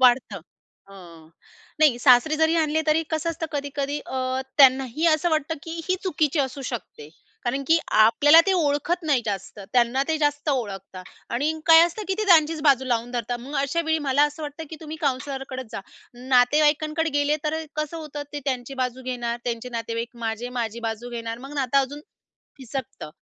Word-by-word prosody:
वाढतं. 240 -6 +3 0.5
हं. 170 -5 -14 0.5
नाही 285 -6 +5
सासरे 255 +5 +5
जरी 320 +1 +3
आणले 315 -1 +1
तरी 310 +1 +3
कसं 315 +1 -1
असतं. 330 0 -4
कधी-कधी 285 0 -3
अ, 260 0 -2 0.2
त्यांनाही 265 +3 +4
असं 315 +2 +3
वाटतं 310 0 0
की 330 0 -6
ही 370 - +3
चुकीची 310 -4 0
असू 270 0 -3
शकते. 230 - -7 0.4
कारण 265 +3 -1
की 325 +3 +5 0.2
आपल्याला 290 +9 +7
ते 390 - +3
ओळखत 335 +1 0
नाही 270 -5 +2
जास्त, 200 0 -5
त्यांना 245 +2 +3
ते 320 - +1
जास्त 295 0 0
ओळखतात 195 -8 -3 0.3
आणि 285 +6 0
काय 325 -1 +9
असतं 385 +5 -6
की 385 - +1
ते 430 - 0
त्यांचीचं 320 -4 +4
बाजू 270 -3 +4
लावून 240 -1 -1
धरतात. 240 0 -3
मग 270 +5 -7
अशावेळी 320 +3 0
मला 275 +2 +3
असं 295 +2 -4
वाटतं 295 +2 -6
की 320 - -7
तुम्ही 315 0 -7
काउंसलरकडंच 265 -2 -3
जा. 225 - -4 0.3
नातेवाईकांकडे 295 +6 +2
गेले 290 +1 +2
तर 305 - 0
अ, 320 0 -3
कसं 305 +2 -3
होतं 300 -2 -6
ते 290 - -4
त्यांची 260 -1 -3
बाजू 250 +1 -4
घेणार 240 -2 -3
त्यांचे 235 0 -3
नातेवाईक. 230 0 -3 0.2
माझे 225 +2 -3
माझी 230 0 -4
बाजू 225 +2 -6
घेणार, 230 -1 -5
मग 270 +3 -10
नातं 275 -1 +1
अजून 275 +2 -2 0.6
फिसकतं. 260 - -7
275 Hz, 175 wpm, -24 LUFS, 245-310 Hz, 0.6 s, काय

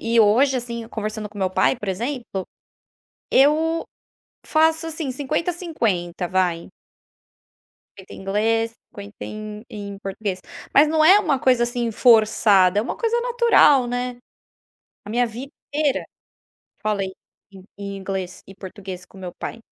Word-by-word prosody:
e 230 +1 +1
hoje 255 +6 +4
assim 235 -2 -5
conversando 215 -1 -4
com 205 - -12
meu 190 -1 0
pai, 185 - +2
por 210 -4 -7
exemplo, 225 -1 -3 0.9
eu 315 +4 +3 0.6
faço 320 +1 +2
assim 315 -4 -4
50, 300 +6 -1
50, 205 - -2
vai. 180 -2 0 1.3
50 190 -1 -12
em - - -11
inglês, 225 +4 0 0.2
50 205 +1 -10
em 215 0 -7
em 200 -1 -7
português, 195 -1 -4 0.3
mas 295 +2 +7
não 310 0 +3
é 375 +6 +8
uma 310 -10 +1
coisa 250 -2 +3
assim 240 -1 -2
forçada, 210 -4 +4
uma - - -4
coisa 470 0 0
natural, 470 - +4
né, 245 0 -3 0.9
a 205 - -8
minha 245 +2 +2
vida 245 +5 -8 0.2
inteira, 295 -2 +1 0.8
falei 200 -3 -1 0.4
em 190 -1 -13 0.2
em 200 -1 -5
inglês 190 -1 -5
e 195 - -12
português 190 -1 -9
com 195 - -16
meu 180 -2 -7
pai. 230 - -6
225 Hz, 140 wpm, -22 LUFS, 195-275 Hz, 1.3 s, é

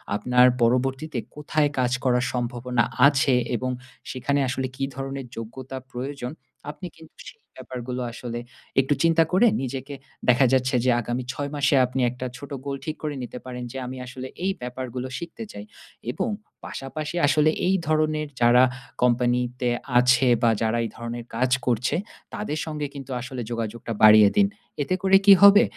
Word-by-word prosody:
আপনার 125 +3 +4 0.2
পরবর্তীতে 130 +4 +1 0.2
কোথায় 150 0 0
কাজ 125 -1 +1
করার 125 -1 +2
সম্ভাবনা 125 0 -1 0.2
আছে 140 -1 +3 0.2
এবং 130 +2 -2 0.4
সেখানে 140 +2 0
আসলে 130 0 -2
কী 135 - -4
ধরনের 135 0 -5
যোগ্যতা 130 +4 -7
প্রয়োজন, 130 +1 -5 0.4
আপনি 180 +4 -8
কিন্তু 160 -1 -16
সেই 450 - -12 0.2
ব্যাপারগুলো 125 0 -5
আসলে 120 0 -6 0.4
একটু 135 +2 +1
চিন্তা 165 0 +5
করে 195 +7 +5
নিজেকে 135 +2 -5 0.3
দেখা 125 +2 +5
যাচ্ছে 130 0 +2
যে - - +4
আগামী 120 +2 -3
6 145 -1 -4
মাসে 145 0 +2
আপনি 130 +1 -4
একটা 125 +1 -6
ছোট 140 - -10 0.2
গোল 140 -1 -2
ঠিক 155 - -3
করে 150 -1 -2
নিতে 125 - -7
পারেন, 125 -1 -6
যে 135 - -7
আমি 130 +1 -6
আসলে 130 +1 -7 0.2
এই 195 - +2
ব্যাপারগুলো 125 0 -5
শিখতে 170 - -7
চাই। 100 0 -9 0.5
এবং 230 - -2 0.4
পাশাপাশি 150 +4 -5
আসলে 150 +2 +4 0.2
এই 190 - +3
ধরনের 155 -1 +1
যারা 120 +1 +6 0.4
কোম্পানিতে 125 0 +1 0.3
আছে 125 +1 +5
বা 115 - +4
যারা 110 +1 +1
এই - - -4
ধরনের 120 -1 -6
কাজ 125 +2 +1
করছে, 125 0 +1 0.4
তাদের 155 -8 -3
সঙ্গে 150 -2 -3
কিন্তু 135 -1 -8
আসলে 125 0 -6
যোগাযোগটা 115 0 -4
বাড়িয়ে 105 -1 +9
দিন। 200 -1 +6 0.4
এতে 185 +6 0
করে 195 0 +6
কী 200 - +10
হবে? 200 0 +9
130 Hz, 160 wpm, -24 LUFS, 125-145 Hz, 0.5 s, কী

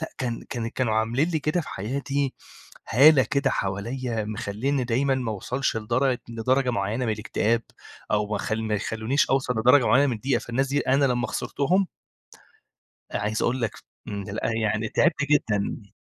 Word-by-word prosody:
لأ، - - -2
كان 120 -3 -3
كان 115 -2 -3
كانوا 115 -3 -1
عاملين 120 +8 +1
لي 160 -3 0
كده 155 +4 0
في 150 - -8
حياتي 135 +6 -2 0.5
هالة 140 +3 +7
كده 140 -1 +2
حواليّا 115 +4 -2
مخلّينّي 110 +6 -2
دايمًا 130 +3 +1
ما 125 -4 -2
اوصلش 125 +5 -2
لدرجة 120 +4 0
لدرجة 125 +3 +1
معينة 110 +4 -1
من 110 - +1
الاكتئاب 115 +1 0 0.5
أو 105 0 +1
ما 105 - 0
خ - - -4
ما 110 -1 -1
يخلونيش 110 +6 0
أوصل 130 -2 +1
لدرجة 125 +3 +5
معينة 140 +2 +5
من 120 -4 -1
الضيقة، 125 +2 0
فالناس 130 +3 -1
دي 145 +1 +1
أنا 135 +2 +2
لما 125 -2 +1
خسرتهم 185 +7 0 1.3
أ - - -1
عايز 105 +1 -1
أقول 130 +1 0
لك 115 - 0 0.4
إمم، 100 -1 -4
لأ، 110 +2 -2
يعني 110 0 0
تعبت 145 - +2
جدًا. 105 -6 0
120 Hz, 170 wpm, -25 LUFS, 110-135 Hz, 1.3 s, هالة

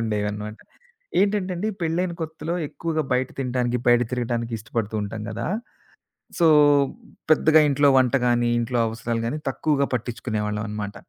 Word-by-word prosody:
ఉండేవన్నమాట. 105 -1 -3 0.6
ఏంటంటే 200 -2 +1
అండి, 215 +5 -2
పెళ్ళైన 170 +2 0
కొత్తలో 160 +1 -4
ఎక్కువగా 160 -2 -2
బయట 130 0 +1
తినటానికి, 125 -2 0
బయట 120 0 +6
తిరగటానికి 120 -1 -2
ఇష్టపడుతూ 110 0 -4
ఉంటాం 105 +1 -5
గదా! 115 +2 -4 0.9
సో 170 - +5 0.8
పెద్దగా 155 0 +5
ఇంట్లో 145 +1 +4
వంట 130 0 +3
గాని, 120 -1 +2
ఇంట్లో 120 +1 -1
అవసరాలు 115 +1 -3
గాని, 150 +6 -3
తక్కువగా 140 -3 0
పట్టిచ్చుకునేవాళ్ళం 110 -3 -2
అనమాట. 105 -1 -5
120 Hz, 130 wpm, -24 LUFS, 110-155 Hz, 0.9 s, బయట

